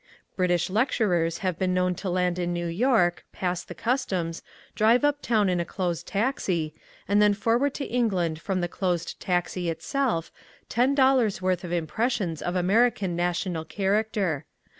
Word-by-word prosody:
British 175 -2 +1
lecturers 185 -7 +1
have 180 -3 -1
been 185 -1 +1
known 180 0 +2
to 185 +2 -5
land 180 0 0
in 175 0 -1
New 175 0 -2
York, 175 -2 +2
pass 180 -1 -2
the - - -10
customs, 190 -10 -1 0.3
drive 225 +6 +4
uptown 240 -8 +2
in 180 -1 +1
a - - +1
closed 175 -2 -3
taxi, 195 - -1 0.3
and 205 +1 +3
then 210 -1 +5
forward 240 +6 +1
to 275 - -3
England 185 -10 0
from 190 -1 -1
the 175 - 0
closed 175 -1 -2
taxi 180 -1 -1
itself 195 - -1 0.4
ten 255 +4 +2
dollars' 260 -7 +3
worth 185 -1 0
of 175 - -6
impressions 175 - -1
of 175 - -2
American 195 0 +2
national 175 -1 -1
character. 195 -3 -1
185 Hz, 155 wpm, -26 LUFS, 175-220 Hz, 0.4 s, then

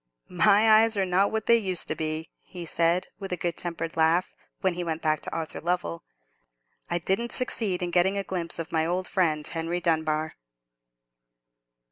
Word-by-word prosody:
"My 215 +4 +6
eyes 225 -1 +1
are 195 - +1
not 190 +2 +2
what 220 0 -2
they 235 - +5
used 190 -6 +1
to 155 - -1
be," 155 +1 -4
he 175 -2 -10
said, 170 +2 +1
with 195 -2 -7
a 180 - -1
good 170 0 -2
tempered 165 -2 -4
laugh, 165 +3 +2 0.3
when 190 -2 +1
he 175 +1 -4
went 165 -1 -3
back 155 -1 +1
to - - -5
Arthur 160 -1 -5
Lovell. 175 0 -2 0.9
"I 175 - +1
didn't 195 +7 0
succeed 210 -7 +1
in 175 - -3
getting 185 +3 +2
a 200 - -1
glimpse 180 -3 -3
of 165 -1 -6
my 160 -1 +1
old 180 +3 -1
friend 155 -5 0
Henry 165 +1 -2
Dunbar." 160 -2 -1
175 Hz, 180 wpm, -26 LUFS, 165-190 Hz, 0.9 s, My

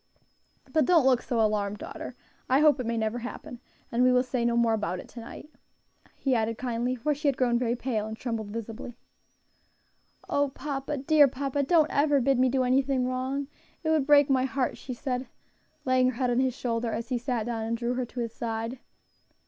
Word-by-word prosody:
But 315 - +4
don't 335 -6 +4
look 255 -2 +4
so 240 - -2
alarmed, 210 -2 +1
daughter; - - -8 0.3
I 265 +3 +4
hope 300 -2 +5
it 250 - -3
may 230 0 -1
never 220 +2 -1
happen; 240 0 -8 0.3
and 235 - +1
we 255 0 +5
will 250 0 +4
say 255 -2 -2
no 235 0 +2
more 235 -1 +3
about 195 -5 -2
it - - -10
to 240 - -10
night," 235 +6 -10 0.7
he 270 - 0
added, 225 -1 0
kindly, 245 0 -1
for 295 +5 0
she 295 +1 -3
had 275 -2 +2
grown 240 -2 +2
very 240 -1 0
pale 235 -4 -2
and 220 0 -6
trembled 230 -4 -3
visibly. 230 +2 -7 1.3
"O 285 0 +1
papa, 275 +1 -4
dear 290 +1 +5
papa! 275 +2 -2
don't 310 +2 +3
ever 285 0 +3
bid 270 0 +2
me 255 0 +4
do 260 0 +1
anything 260 0 +2
wrong; 260 +2 -2 0.4
it 315 - +1
would 305 -4 +2
break 290 -1 +6
my 260 -2 +2
heart," 265 -1 -1
she 255 - -7
said, 250 +1 -3 0.6
laying 255 -1 +3
her 255 - -4
head 250 0 0
on 240 - +2
his 260 -2 +1
shoulder 230 -1 -1
as 230 +3 -4
he 250 -2 0
sat 240 -3 -2
down 230 -2 -3
and 230 +1 -1
drew 240 +1 -1
her 250 0 -2
to 245 - -5
his 230 -1 -4
side. 230 +2 -4
250 Hz, 210 wpm, -27 LUFS, 230-270 Hz, 1.3 s, break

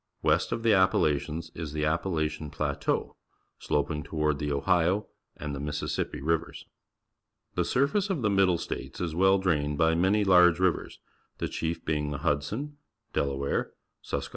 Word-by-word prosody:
West - - +2
of 115 - -2
the 115 -2 +5
Appa 95 -1 +4
lachians 80 +2 -1
is 80 -3 -6
the^Ap 80 +2 +1
palachian 80 -4 -2
Plateau, - - -2 0.4
sloping 75 +1 -1
toward 75 -1 -1
the 75 0 -2
Ohio 80 +6 +2
Map - - -22
showin: - - -34 0.4
and 75 -1 -3
the - - -5
Mississippi 75 -2 -3
Rivers. 80 +2 -1 0.9
The - - +1
surface 145 +11 +1
of 165 -11 -1
the 105 - +3
Middle 95 -3 +3
States - - -6
is 85 -3 -2
well 95 +3 +4
drahied 75 -6 0
by 80 +1 +3
many 95 +5 +3
large 90 -3 +6
ri\'ers, 95 -2 0 0.4
the - - -2
chief 80 0 -3
being 75 -1 -1
the 75 - -3
Hudson. 110 - -1 0.4
Delaware, 70 0 -1 0.3
^iisqii.e. - - -3
80 Hz, 165 wpm, -28 LUFS, 75-95 Hz, 0.9 s, large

